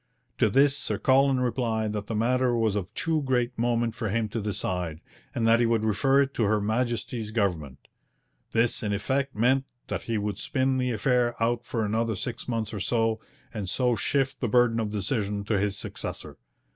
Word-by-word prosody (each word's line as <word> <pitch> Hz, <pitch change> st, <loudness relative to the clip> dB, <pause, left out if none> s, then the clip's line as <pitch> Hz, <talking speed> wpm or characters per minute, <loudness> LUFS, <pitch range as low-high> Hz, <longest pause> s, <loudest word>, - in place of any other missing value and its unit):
To 110 Hz, -, +4 dB
this 140 Hz, +5 st, +4 dB
Sir -, -, -1 dB
Colin 135 Hz, 0 st, +3 dB
replied 115 Hz, -4 st, 0 dB
that 105 Hz, -1 st, -4 dB
the 115 Hz, -, -3 dB
matter 125 Hz, +2 st, +2 dB
was 110 Hz, -3 st, +1 dB
of 100 Hz, -4 st, -3 dB
too 160 Hz, -1 st, 0 dB
great 125 Hz, -2 st, 0 dB
moment 120 Hz, 0 st, 0 dB
for 110 Hz, -, -3 dB
him 110 Hz, +1 st, 0 dB
to 115 Hz, +2 st, -3 dB
decide, 90 Hz, -5 st, -3 dB, 0.4 s
and 115 Hz, -1 st, +1 dB
that 115 Hz, +1 st, +5 dB
he 120 Hz, -, +3 dB
would 115 Hz, -1 st, +1 dB
refer 135 Hz, +6 st, +3 dB
it 140 Hz, 0 st, -5 dB
to 120 Hz, -, 0 dB
Her 105 Hz, +1 st, +2 dB
Majesty's 115 Hz, +1 st, -2 dB
government. 90 Hz, -, -2 dB, 0.6 s
This 115 Hz, +1 st, +1 dB
in 105 Hz, -2 st, -1 dB
effect 135 Hz, +7 st, -1 dB
meant 130 Hz, +5 st, +2 dB, 0.2 s
that -, -, -2 dB
he 115 Hz, -1 st, -1 dB
would 105 Hz, -1 st, -2 dB
spin 130 Hz, -2 st, 0 dB
the 125 Hz, 0 st, 0 dB
affair 120 Hz, +1 st, +1 dB
out 120 Hz, +1 st, +1 dB
for 115 Hz, -3 st, -1 dB
another 110 Hz, +1 st, 0 dB
six 115 Hz, +5 st, -5 dB
months 115 Hz, -3 st, -2 dB
or 105 Hz, -, -3 dB
so, 115 Hz, +2 st, +1 dB, 0.3 s
and 105 Hz, -5 st, -4 dB
so 125 Hz, +3 st, +1 dB
shift 135 Hz, +4 st, 0 dB
the 125 Hz, -, +1 dB
burden 120 Hz, 0 st, +3 dB
of 110 Hz, -2 st, -1 dB
decision 105 Hz, 0 st, -2 dB
to 105 Hz, -1 st, 0 dB
his 100 Hz, 0 st, -1 dB
successor. -, -, -6 dB
115 Hz, 195 wpm, -27 LUFS, 105-125 Hz, 0.6 s, that